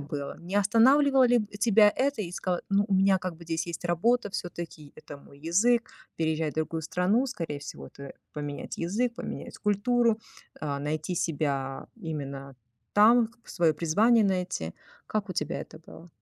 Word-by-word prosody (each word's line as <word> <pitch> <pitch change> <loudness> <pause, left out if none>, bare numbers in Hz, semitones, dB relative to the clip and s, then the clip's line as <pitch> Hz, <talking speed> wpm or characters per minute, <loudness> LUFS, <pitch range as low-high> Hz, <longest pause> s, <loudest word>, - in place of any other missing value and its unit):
было? 140 -1 -5
Не 175 +3 -8
останавливало 260 +6 +5
ли 240 -3 +3
тебя 210 -1 +6
это 275 -4 0
и 175 -3 -6
ск 180 - -6 0.2
ну, 200 +1 +3
у 195 - +2
меня 190 0 +4
как 180 -2 -5
бы 170 - -13
здесь 165 0 -2
есть 170 0 -6
работа, 205 +6 +1
всё-таки 170 -5 -6
это 145 - -10
мой 140 0 -17
язык, 225 +9 +2 0.3
переезжать 160 -1 0
в - - -24
другую 160 +1 -1
страну, 185 - +1
скорее 165 - -4
всего, 145 - -8
это 140 -1 -10 0.2
поменять 145 -1 -6
язык, 230 +8 0
поменять - - -7
культуру, 225 +2 +2 0.4
а, 145 -2 -2
найти 155 +4 -2
себя 140 -5 -2
именно 140 -4 -6 0.4
там, 225 +3 +6 0.2
к - - -21
свое 165 -3 +2
призвание 210 +8 +3
найти. 180 - -1 0.3
Как 215 -2 -2
у - - -2
тебя 165 +1 -2
это - - -10
было? 165 +1 -14
175 Hz, 165 wpm, -28 LUFS, 155-215 Hz, 0.4 s, тебя